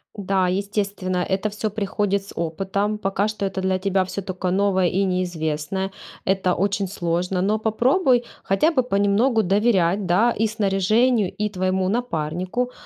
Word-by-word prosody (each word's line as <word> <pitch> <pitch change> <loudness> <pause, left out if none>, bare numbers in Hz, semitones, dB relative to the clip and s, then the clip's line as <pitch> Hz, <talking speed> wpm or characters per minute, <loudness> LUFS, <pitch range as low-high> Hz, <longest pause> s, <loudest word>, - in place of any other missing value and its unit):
Да, 195 -2 0
естественно, 195 -1 -2
это 195 +3 0
всё 210 +1 -3
приходит 200 -1 -1
с - - -12
опытом. 195 +5 -2
Пока 195 +1 0
что 215 -2 -3
это 190 0 -4
для 190 0 +1
тебя 195 0 0
всё 195 +2 -5
только 185 -1 -3
новое 190 -1 +2
и 195 +3 +1
неизвестное, 180 0 -2 0.4
это 190 -1 +1
очень 200 0 0
сложно, 180 0 -1
но 210 +3 +1
попробуй 245 - +2 0.2
хотя 300 - +2
бы 260 -5 +2
понемногу 215 +2 +2
доверять, 195 -1 +2
да, 195 +7 +3
и 225 - +3
снаряжению, 215 +1 +2
и 210 - +1
твоему 185 -1 0
напарнику, 185 +2 -2
195 Hz, 150 wpm, -22 LUFS, 185-210 Hz, 0.4 s, да